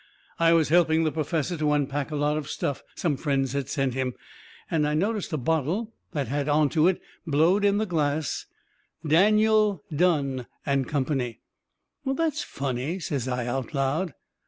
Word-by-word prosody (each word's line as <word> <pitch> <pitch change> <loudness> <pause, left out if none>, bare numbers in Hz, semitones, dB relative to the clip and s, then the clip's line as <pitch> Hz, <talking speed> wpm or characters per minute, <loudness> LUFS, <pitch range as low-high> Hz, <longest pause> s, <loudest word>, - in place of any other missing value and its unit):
I 165 0 +5
was 160 -3 +3
helping 165 -1 +4
the 155 - +1
perfessor 160 +2 -1
to 150 -1 +1
unpack 145 0 -1
a 155 - -4
lot 145 +1 +1
of 155 -2 -4
stuff 140 - -2
some 155 -6 0
friends 135 -3 0
had 140 -1 -2
sent 135 -3 0
him, 130 -1 -2 0.6
and 150 -3 +2
I 150 - 0
noticed 200 +4 -1
a 155 - 0
bottle 165 - -1 0.2
that 145 -5 -1
had 145 +3 -1
onto 155 +2 +3
it, 185 - +2 0.3
blowed 165 +7 +3
in 200 0 +4
the 215 - +1
glass: 155 -5 -1 0.6
DANIEL, 210 +2 +4
DUNNE 140 -7 +1 0.2
AND 140 -3 +1
COMPANY 130 -4 -1 0.6
"That's 285 +3 0
funny," 135 +5 -3
says 140 -8 -3
I, 125 -1 -1
out 125 +2 -3
loud. 140 +3 0
150 Hz, 160 wpm, -26 LUFS, 140-175 Hz, 0.6 s, I